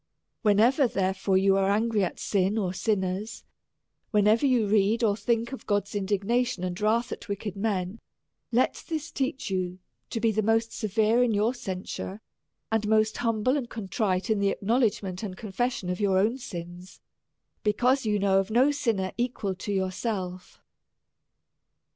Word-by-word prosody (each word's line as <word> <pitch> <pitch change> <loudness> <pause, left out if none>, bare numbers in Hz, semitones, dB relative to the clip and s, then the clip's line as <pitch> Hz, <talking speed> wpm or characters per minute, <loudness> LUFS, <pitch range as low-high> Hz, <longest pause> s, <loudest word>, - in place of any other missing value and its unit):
Whenever^ 235 +5 +4
therefore, 190 0 +1
you 195 0 +4
are 195 0 +2
angry 215 0 +2
at 180 - -2
sin 195 +1 +1
or 185 -4 -1
sin 205 +1 0
ners; 190 +4 -4 0.7
whenever 215 +4 +3
you 245 -4 +3
read 210 +3 +2
or 205 -3 +3
think 230 +1 -1
of 265 - -8
God's 205 -1 0
indigna 205 +4 +1
tion 190 -7 -5
and 180 +1 -3
wrath 225 +3 +1
at - - -7
wicked 200 -1 -4
men, 200 0 -2 0.5
let 245 +2 +1
this 315 -1 -4
teach 265 -5 -2
you 185 -1 -2 0.3
to 230 - -3
be 225 0 +2
the 215 0 +1
most 225 +1 +1
severe 220 +2 +2
in 235 -3 +2
your 215 +4 +2
censure, 190 -2 -5 0.5
and 220 -1 +1
most 215 0 +2
humble 230 +2 +1
and 260 -5 -3
contrite 195 -2 -1
in 215 - +2
the 200 0 +2
acknowledgement 200 -4 0
and 195 -4 -5
confession 220 -1 -2
of 180 0 -2
your 195 -2 +3
own 220 +7 +2
sins, 175 -5 -8 0.6
because 245 +6 +2
you 210 -2 +1
know 195 -1 +3
of 195 +1 -2
no 250 +6 +4
sinner 225 -10 -1
equal 240 -5 -1
to 190 +3 -5
yourself. 190 -1 -3
210 Hz, 160 wpm, -27 LUFS, 190-230 Hz, 0.7 s, Whenever^